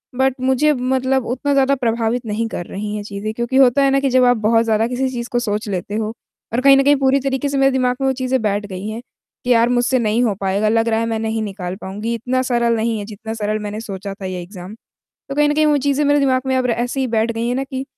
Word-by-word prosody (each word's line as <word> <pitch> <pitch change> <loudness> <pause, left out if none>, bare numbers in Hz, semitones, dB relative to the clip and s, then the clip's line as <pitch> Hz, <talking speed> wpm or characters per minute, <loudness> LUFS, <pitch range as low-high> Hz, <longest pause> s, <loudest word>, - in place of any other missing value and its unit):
But 265 +1 +2
मुझे 265 +4 +3
मतलब 260 0 0
उतना 265 +4 -1
ज़्यादा 275 0 +3
प्रभावित 235 -1 -1
नहीं 220 +1 -2
कर 175 - -5
रही 210 +3 -5
हैं 205 - -4
चीज़ें, 205 +1 -5
क्योंकि 240 +3 -1
होता 270 +1 +5
है 275 - +4
ना 275 - +3
कि 275 -1 0
जब 255 0 +4
आप 245 -1 +4
बहुत 225 +2 +3
ज़्यादा 225 0 +2
किसी 255 +1 -1
चीज़ 240 -1 -5
को 240 - +1
सोच 210 -2 -2
लेते 195 +2 -3
हो, 220 0 -2 0.4
और 245 - +1
कहीं 275 0 +7
न 275 - +4
कहीं, 285 +1 +5
पूरी 270 0 +2
तरीके 270 +1 -1
से 275 - -1
मेरे 270 0 +4
दिमाग 250 -1 +1
में 270 - +2
वो 265 - +2
चीज़ें 260 -1 -1
बैठ 205 -1 -1
गई 190 +1 -6
हैं 220 +2 -5 0.4
कि 250 - -4
यार, 235 0 +4
मुझसे 245 +1 +2
नहीं 225 +2 +1
हो 220 - +1
पाएगा, 200 +2 +1
लग 225 +1 +2
रहा 225 0 +1
है, 230 - 0
मैं 225 -1 -2
नहीं 220 0 -2
निकाल 190 -3 -5
पाऊँगी। 210 +5 -4
इतना 255 +3 -1
सरल 235 -2 +1
नहीं 225 0 -1
है, 205 - -5
जितना 220 +1 -7
सरल 215 -1 -2
मैंने 210 0 -5
सोचा 195 -2 -6
था, 195 -1 -9
ये 185 -1 -4
एग्ज़ाम। 180 +2 -10 0.6
तो 275 - -4
कहीं 295 0 +3
न 295 - +1
कहीं 310 0 +3
वो 295 -1 +3
चीज़ें 285 +1 +2
मेरे 290 0 +3
दिमाग 260 -2 +2
में 260 - +1
अब 255 -1 +1
र - - 0
ऐसे 245 +3 -1
ही 260 - +1
बैठ 225 0 0
गई 230 +1 -3
हैं 245 - 0
ना 270 +1 -1
कि, 265 0 -5
235 Hz, 275 wpm, -19 LUFS, 215-265 Hz, 0.6 s, कहीं